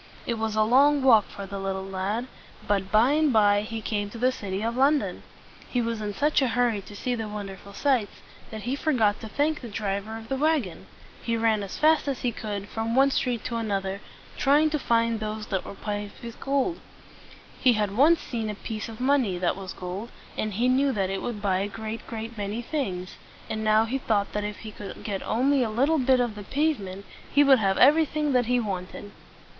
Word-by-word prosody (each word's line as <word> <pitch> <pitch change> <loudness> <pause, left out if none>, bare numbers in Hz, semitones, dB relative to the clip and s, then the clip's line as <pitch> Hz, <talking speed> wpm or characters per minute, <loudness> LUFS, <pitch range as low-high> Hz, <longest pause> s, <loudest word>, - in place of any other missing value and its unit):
It 235 -2 -2
was 220 -1 -1
a 215 - +4
long 275 +5 +4
walk 225 -6 +6
for 200 - -8
the 195 0 -6
little 190 0 -3
lad; 195 +5 -2 0.4
but 195 -2 0
by 225 +5 +5
and 305 -1 +3
by 205 -3 +4
he 220 +1 -5
came 205 -2 -2
to 230 - -9
the 250 +2 +2
city 200 -4 -4
of 230 +1 -1
London. 280 +3 +2 0.5
He 250 - 0
was 230 -2 -2
in 210 -1 -2
such 295 +4 +2
a 265 - +3
hurry 240 -3 +1
to 205 - -10
see 250 +4 -2
the 225 -2 -3
wonderful 200 -1 -7
sights, 245 -2 +1 0.3
that 220 -1 -7
he 250 +3 -1
forgot 240 -9 +1
to 220 - -6
thank 295 +6 0
the 245 - -7
driver 205 0 -3
of 225 0 -10
the 270 - -2
wagon. 285 - 0 0.3
He 230 -1 -1
ran 225 -2 +2
as 200 -2 -6
fast 310 0 +3
as 275 -3 -2
he 245 - 0
could, 205 -3 -5
from 225 +2 -2
one 275 +1 +5
street 245 -4 -1
to 240 -2 -2
another, 200 -3 -2 0.4
trying 295 +3 +4
to 305 - 0
find 230 -2 +1
those 215 0 -4
that 190 -3 -1
were - - -8
paved 205 +1 -5
with 235 0 -8
gold. 280 +5 0 0.8
He 250 - +5
had 210 -2 -1
once 305 +7 +5
seen 225 -3 -3
a 210 - -4
piece 220 +1 -5
of 220 - -9
money 255 -8 +2
that 175 0 0
was 190 -1 -7
gold, 185 +5 -6 0.3
and 215 -1 -2
he 240 +4 +2
knew 270 +2 +3
that 195 -2 -1
it 195 - -2
would 215 -4 -5
buy 190 -2 +2
a 200 - -1
great, 220 +2 -6
great 225 +1 -6
many 205 +4 -3
things; 195 - -3 0.3
and 220 0 -2
now 215 +1 +4
he 260 +4 -2
thought 210 -5 0
that 210 - -1
if 210 0 -5
he 220 - -7
could 205 -1 -9
get 200 -3 -3
only 270 +4 +2
a 235 - +1
little 275 +8 +2
bit 260 0 +4
of 240 -3 0
the 210 - -8
pave 295 +7 0
ment, 195 0 -8 0.3
he 285 - +5
would 270 -3 +6
have 195 -2 +1
everything 300 0 +4
that 245 -2 +2
he 250 0 +2
wanted. 200 -1 -5
225 Hz, 220 wpm, -26 LUFS, 205-260 Hz, 0.8 s, walk